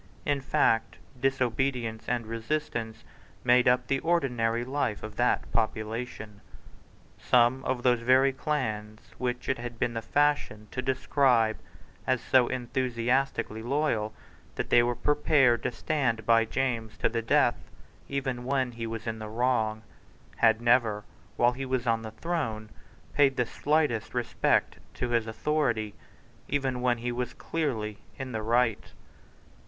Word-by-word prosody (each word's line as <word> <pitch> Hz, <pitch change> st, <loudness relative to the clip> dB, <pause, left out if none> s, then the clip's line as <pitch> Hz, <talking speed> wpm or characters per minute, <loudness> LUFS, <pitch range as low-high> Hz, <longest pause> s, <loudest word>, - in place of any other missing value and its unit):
In 145 Hz, -2 st, 0 dB
fact 115 Hz, -4 st, +1 dB, 0.2 s
disobedience 125 Hz, -3 st, -1 dB
and 120 Hz, -2 st, -1 dB
resistance 115 Hz, -1 st, -3 dB, 0.4 s
made 125 Hz, 0 st, +4 dB
up 125 Hz, 0 st, +3 dB
the 135 Hz, +2 st, 0 dB
ordinary 120 Hz, -9 st, 0 dB
life 130 Hz, -5 st, -2 dB
of 110 Hz, -1 st, -7 dB
that 120 Hz, 0 st, +1 dB
population. 110 Hz, -1 st, -3 dB, 0.8 s
Some 125 Hz, +2 st, +3 dB
of 125 Hz, -1 st, -1 dB
those 125 Hz, -2 st, +4 dB
very 130 Hz, +3 st, +4 dB
clans 110 Hz, -7 st, -3 dB
which 125 Hz, 0 st, -2 dB
it 130 Hz, -, 0 dB
has 120 Hz, 0 st, -5 dB
been 120 Hz, +1 st, -1 dB
the 115 Hz, -, -3 dB
fashion 145 Hz, -7 st, 0 dB
to 130 Hz, -, -3 dB
describe 130 Hz, -3 st, +2 dB, 0.5 s
as 130 Hz, -1 st, +2 dB
so 125 Hz, 0 st, +3 dB
enthusiastically 125 Hz, -2 st, -1 dB
loyal 120 Hz, -4 st, 0 dB, 0.4 s
that -, -, -4 dB
they 120 Hz, -, +7 dB
were 120 Hz, 0 st, 0 dB
prepared 135 Hz, -3 st, +3 dB
to -, -, -1 dB
stand 120 Hz, -6 st, -1 dB
by 115 Hz, 0 st, +4 dB
James 115 Hz, -3 st, -2 dB
to -, -, +1 dB
the 115 Hz, 0 st, -1 dB
death, 115 Hz, -, +2 dB, 0.4 s
even 130 Hz, -3 st, -2 dB
when 130 Hz, -1 st, 0 dB
he 115 Hz, -1 st, -5 dB
was 115 Hz, 0 st, -5 dB
in 110 Hz, -1 st, -3 dB
the 110 Hz, -1 st, -6 dB
wrong, 110 Hz, -2 st, 0 dB, 0.5 s
had 115 Hz, -1 st, +4 dB
never, 120 Hz, -3 st, +3 dB, 0.3 s
while 120 Hz, 0 st, +4 dB
he 130 Hz, +2 st, -6 dB
was 130 Hz, -2 st, -1 dB
on 115 Hz, -1 st, +1 dB
the 110 Hz, -, -6 dB
throne, 110 Hz, -5 st, -3 dB, 0.4 s
paid 135 Hz, -2 st, +3 dB
the 125 Hz, -, +2 dB
smallest 145 Hz, -4 st, 0 dB
respect 120 Hz, -1 st, +1 dB, 0.2 s
to 125 Hz, -, -2 dB
his 115 Hz, -2 st, +1 dB
authority, 110 Hz, -2 st, -1 dB, 0.5 s
even 135 Hz, -3 st, -1 dB
when 125 Hz, -1 st, +2 dB
he 120 Hz, +1 st, -3 dB
was 125 Hz, 0 st, -3 dB
clearly 110 Hz, -10 st, -3 dB, 0.2 s
in 130 Hz, -1 st, -5 dB
the 110 Hz, -2 st, -3 dB
right. 115 Hz, 0 st, +1 dB
120 Hz, 145 wpm, -28 LUFS, 115-130 Hz, 0.8 s, they